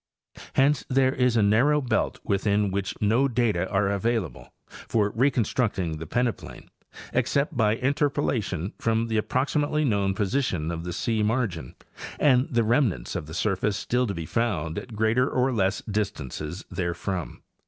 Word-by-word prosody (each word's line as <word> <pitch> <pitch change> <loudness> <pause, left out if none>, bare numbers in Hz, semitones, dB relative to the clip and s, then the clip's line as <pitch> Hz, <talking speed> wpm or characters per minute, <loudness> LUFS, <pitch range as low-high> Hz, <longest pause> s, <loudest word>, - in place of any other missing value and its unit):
Hence 140 +2 +3
there 130 0 +3
is 125 -2 +2
a 110 - +4
narrow 125 +9 +4
belt 120 -5 -1
within 100 0 +1
which 100 0 -3
no 115 +6 +3
data 115 -8 0
are 100 0 +1
available 105 +1 -2 0.2
for 105 -2 -1
reconstructing 115 - 0
the 80 - -7
peneplain, 120 +3 -3 0.4
except 140 +2 +1
by 110 -2 +3
in 130 +4 0
terpolation 135 - -1
from 115 0 0
the 110 - 0
approximately 145 +6 0
known 100 -5 +1
position 95 - -1
of 85 0 -5
the 90 - -4
sea 110 +3 -1
margin 105 - -1 0.4
and 130 -3 +4
the 120 -2 +2
remnants 120 - +1
of 75 - -4
the 80 - -8
surface 95 +1 0
still 125 +1 0
to 100 - -3
be 85 -1 -4
found 85 -7 -1
at - - -10
ereater 110 +3 +1
or 130 +1 +1
less 95 -3 +1
distances 90 - -4
therefrom. 90 -1 -3
110 Hz, 155 wpm, -26 LUFS, 95-125 Hz, 0.4 s, a